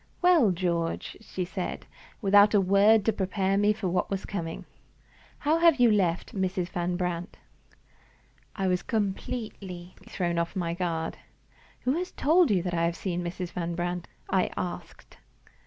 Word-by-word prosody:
"Well, 350 - +5
George?" 170 -2 -1
she 190 -4 -4
said, 185 0 -5 0.4
without 205 +1 +6
a - - +6
word 200 +3 +4
to 225 - +3
prepare 195 0 0
me 205 +1 +4
for 210 -2 -2
what 180 0 0
was 195 -1 -3
coming. 165 -5 -5 0.7
"How 310 +3 +1
have 335 -4 +5
you 240 -2 +6
left 185 -5 +1
Mrs. 185 -2 -1
Van 175 0 -2
Brandt?" 180 0 -3 1.2
I 195 - -2
was 180 -1 +1
completely 195 -4 -4 0.2
thrown 175 -2 -1
off 170 0 -2
my 170 -3 -1
guard. 170 -2 -2 0.6
"Who 250 - +1
has 365 - -4
told 330 +2 +3
you 190 -5 +2
that 180 -1 -3
I 170 -1 +1
have 170 0 -1
seen 175 -2 -3
Mrs. 175 0 -5
Van 170 -1 -3
Brandt?" 175 0 -3 0.2
I 190 -1 +1
asked. 175 -1 -6
185 Hz, 155 wpm, -27 LUFS, 175-205 Hz, 1.2 s, without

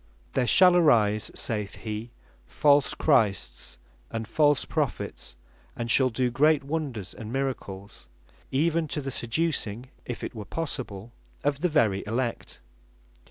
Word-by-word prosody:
"There 125 - +1
shall 180 +4 +7
arise," 110 - +4
(saith 105 -3 -2
he) 110 +1 -5 0.4
"false 145 -2 +3
Christs, 105 - +1 0.3
and 115 -1 -4
false 145 +3 +3
Prophets, - - -3 0.4
and 115 0 -2
shall 130 0 +5
doe 125 +1 0
great 150 +3 +3
wonders 140 - -4
and 110 0 -8
miracles, 110 - -4 0.4
even 160 +3 +1
to 150 - -3
the 135 0 -4
seducing 125 -3 -2 0.2
(if 120 - -5
it - - -4
were 110 -3 -7
possible) 120 -10 -5 0.3
of 140 0 0
the 180 - +2
very 110 -11 +2
Elect." 120 +2 -3
125 Hz, 130 wpm, -27 LUFS, 110-145 Hz, 0.4 s, shall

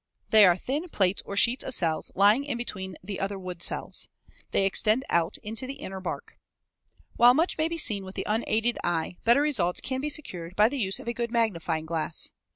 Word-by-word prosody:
They 215 -3 +8
are 175 0 +4
thin 295 - -4
plates 195 -7 +1
or 200 - -5
sheets 240 +5 +3
of 260 - 0
cells 160 -3 +1
lying 205 +7 +4
in 280 -4 -3
between 190 -6 -5
the 195 0 -6
other 195 +1 -2
wood 180 -2 -7
cells. - - 0 0.4
They 195 - +1
extend 215 +6 +3
out 170 +2 +1
into 225 +4 -5
the 275 - -6
inner 190 -6 -7
bark. 185 - -7 0.8
While 245 +1 +7
much 325 +3 0
may 315 - +2
be 335 0 -4
seen 210 -10 0
with 190 0 -10
the - - -4
unaided 225 +2 0
eye, 175 0 -2
better 240 +5 +5
results 200 -13 +1
can 260 0 -3
be 300 - -2
secured 185 - -4
by 210 +2 +5
the 280 +1 -4
use 195 -4 0
of - - -11
a 235 - -1
good 235 0 -3
magnifying 175 -9 -1
glass. 160 0 -2
210 Hz, 210 wpm, -27 LUFS, 185-245 Hz, 0.8 s, They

